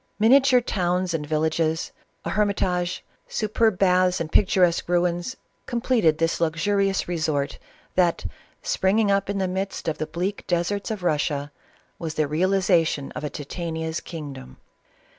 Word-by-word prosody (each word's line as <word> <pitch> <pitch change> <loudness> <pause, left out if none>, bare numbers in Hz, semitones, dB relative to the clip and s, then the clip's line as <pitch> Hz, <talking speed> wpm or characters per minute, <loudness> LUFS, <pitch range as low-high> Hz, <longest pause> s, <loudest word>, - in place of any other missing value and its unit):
Minia 230 +6 +6
ture 255 -2 +4
towns 180 -4 -1
and 150 -2 -2
villages, 160 +1 0 0.3
a - - -2
hermitage, 185 -4 0 0.2
superb 215 -1 +1
baths, 180 -1 +3
and 160 -1 -4
picturesque 180 -4 +3
ruins, 175 +6 0 0.3
completed 235 -10 +2
this 165 +1 0
luxurious 195 +4 +1
resort, 155 -5 -1 0.3
that, 175 -2 +2 0.4
springing 215 - +2
up 195 0 +1
in 200 - -1
the 190 -1 0
midst 190 0 -4
of 160 - -1
the 155 - -2
bleak 185 +5 -3
deserts 180 +5 -1
of 215 -4 -4
Rus 155 -4 +2
sia, 145 -2 -4 0.5
was 160 -2 -4
the 155 -1 +1
realization 170 -2 +1
of - - -6
a 150 - -2
Titania's 160 +2 -4
kingdom. 140 - -8
180 Hz, 140 wpm, -24 LUFS, 160-195 Hz, 0.5 s, Minia